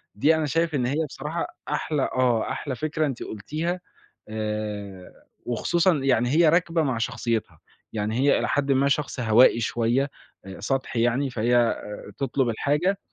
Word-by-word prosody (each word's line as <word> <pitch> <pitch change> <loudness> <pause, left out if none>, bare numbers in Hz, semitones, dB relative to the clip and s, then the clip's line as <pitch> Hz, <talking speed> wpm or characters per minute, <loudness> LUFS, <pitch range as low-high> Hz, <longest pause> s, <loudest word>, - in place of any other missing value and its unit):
دي 155 +9 +4
أنا 160 -1 0
شايف 165 +2 0
إن 125 -3 +1
هي 150 +5 0
بصراحة 150 +5 -4 0.2
أحلى 150 -1 -1
آه، 125 -3 +1
أحلى 135 -3 -4
فكرة 155 +1 -1
أنتِ 135 -4 -3
قلتيها 160 - -3 0.5
آآ، 105 -3 -5 0.3
وخصوصًا 170 - +2
يعني 135 -4 +2
هي 160 +2 +5
راكبة 170 0 +2
مع 130 -5 0
شخصيتها، 115 -1 -2 0.3
يعني 110 0 -2
هي 140 +2 +4
إلى - - -1
حدٍ 140 -1 +1
ما، 135 +1 +3
شخص 140 -2 -1
هوائي 115 +1 +5
شوية، 120 +5 0 0.5
سطحي 130 +1 -1
يعني، 130 +3 +1
فهي 120 0 +2 0.4
تطلب 135 -2 0
الحاجة 150 - +1
135 Hz, 145 wpm, -25 LUFS, 115-150 Hz, 0.5 s, هي